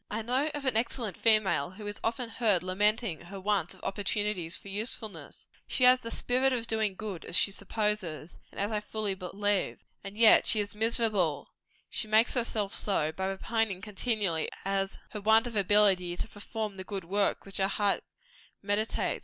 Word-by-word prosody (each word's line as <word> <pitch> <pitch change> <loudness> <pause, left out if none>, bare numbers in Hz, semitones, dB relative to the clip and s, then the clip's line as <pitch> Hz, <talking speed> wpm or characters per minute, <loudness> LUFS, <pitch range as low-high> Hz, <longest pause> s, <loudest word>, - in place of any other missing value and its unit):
I 220 +2 -3
know 255 +6 0
of 290 -1 -6
an 260 -4 +1
excellent 230 -2 -1
female 215 -5 +2
who 205 +3 -11
is 205 0 -6
often 235 +2 -1
heard 215 -5 +2
lamenting 205 0 +1
her 195 +3 -9
want 190 -3 -1
of 185 - -20
opportunity 205 -3 -1
for 185 - -3
usefulness. 215 +1 -2 0.2
She 255 - 0
has 250 0 +7
the 230 - -7
spirit 255 +3 +1
of 235 -2 -1
doing 220 -4 -1
good 195 -5 -6
as 175 - -2
she 200 - +4
supposes, 200 -6 -3
and - - -10
as 200 +2 -1
I 215 - 0
fully 210 -1 -2
believe. 195 +2 -2 0.3
And 200 +1 -9
yet 225 -1 +7
she 220 - +4
is 205 -1 -3
miserable 215 -7 +1 0.4
she 220 - -1
makes 220 +2 +4
herself 220 -4 -1
so 160 -7 +1
by 190 +4 -4
repining 200 0 -2
continually 205 -5 -1 0.2
at 195 0 -1
her 210 - -6
want 220 +2 +4
of 240 -2 -6
ability 195 -3 +4
to - - -3
perform 210 -1 -6
the 190 - -6
good 195 -1 -5
works 200 +3 +1
which 195 - -8
her 195 -1 +2
heart 200 0 0 0.6
meditates. 205 +2 -1
210 Hz, 180 wpm, -29 LUFS, 195-225 Hz, 0.6 s, has